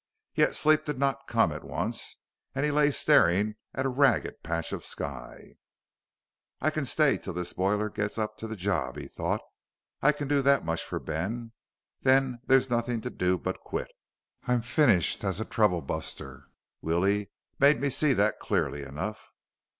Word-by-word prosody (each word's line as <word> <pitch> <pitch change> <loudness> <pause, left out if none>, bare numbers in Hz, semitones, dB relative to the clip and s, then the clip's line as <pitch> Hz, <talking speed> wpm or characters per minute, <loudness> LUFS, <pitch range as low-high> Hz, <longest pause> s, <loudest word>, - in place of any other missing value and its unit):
Yet - - +2
sleep 155 0 +3
did 150 -3 -3
not 135 0 -1
come - - +3
at - - -6
once, - - -2 0.4
and 135 +2 +1
he 150 - +1
lay 145 0 +4
staring 100 -5 +4 0.2
at 135 - -1
a - - +2
ragged 130 -3 +2
patch 85 0 -3
of - - -4
sky. - - -7 1.0
I 155 - +1
can 155 -2 -2
stay 150 +1 +3
till 95 - -6
this 90 0 -4
boiler 105 +3 +1
gets 105 0 -3
up 110 -1 -2
to 110 - -6
the 110 - -5
job, 90 -10 -1
he - - -6
thought. - - -2 0.6
_I 150 +1 +4
can 145 - -3
do 145 0 +2
that 140 -4 +3
much 80 0 -1
for - - -4
Ben. 115 +9 -4 0.5
Then 130 -2 +3
there's 135 0 +5
nothing 120 -1 -1
to - - -5
do 90 0 +1
but - - -4
quit. - - -5 0.6
I'm 125 -2 +2
finished 120 - +3
as 95 -1 -1
a 110 - -2
troublebuster. 85 -7 -2 0.4
Willie 100 +5 +1 0.3
made 140 +2 +5
me 140 -1 0
see 145 +1 +3
that 105 -1 +1
clearly 75 -8 -1
enough. 80 +11 -6
110 Hz, 170 wpm, -28 LUFS, 90-135 Hz, 1.0 s, there's